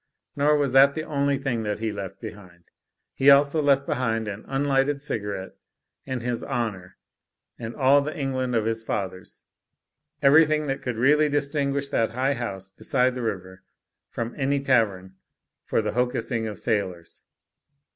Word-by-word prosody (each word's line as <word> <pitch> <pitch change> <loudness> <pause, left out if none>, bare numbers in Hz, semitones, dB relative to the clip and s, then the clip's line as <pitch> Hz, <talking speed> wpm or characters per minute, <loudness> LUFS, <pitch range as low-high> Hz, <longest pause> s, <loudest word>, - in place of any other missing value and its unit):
Nor 150 +1 +3
was 140 -3 0
that 140 +1 +6
the 155 - -3
only 140 -2 0
thing 135 -4 -2
that 105 -1 -2
he 110 0 -2
left 100 -2 -7
behind. 95 -6 -11 0.5
He 135 - +4
also 140 +2 +5
left 140 -1 +3
behind 115 -4 -1
an 105 +1 -6
unlighted 135 +1 +1
cigarette 105 -8 -4 0.6
and 130 -3 -3
his 120 -1 -2
honour 110 -8 -4 0.6
and 115 -1 -6
all 140 +1 +4
the 155 +4 -5
England 130 -3 -1
of 110 -2 +1
his 115 0 -1
father's; 95 -4 -5 0.8
ever)rthing 155 +2 +5
that 135 -1 -3
could 125 -2 -3
really 150 +5 +4
distinguish 140 -1 0
that 115 -5 0
high 130 +3 +1
house 100 -7 -5
beside 125 +6 0
the 125 - -5
river 95 -4 -5 0.5
from 115 0 -4
any 140 0 +1
tavern 100 -8 0 0.5
for 110 - 0
the 105 - -1
hocussing 120 -1 -1
of 105 -2 -6
sailors. 90 -7 -3
125 Hz, 155 wpm, -25 LUFS, 110-140 Hz, 0.8 s, that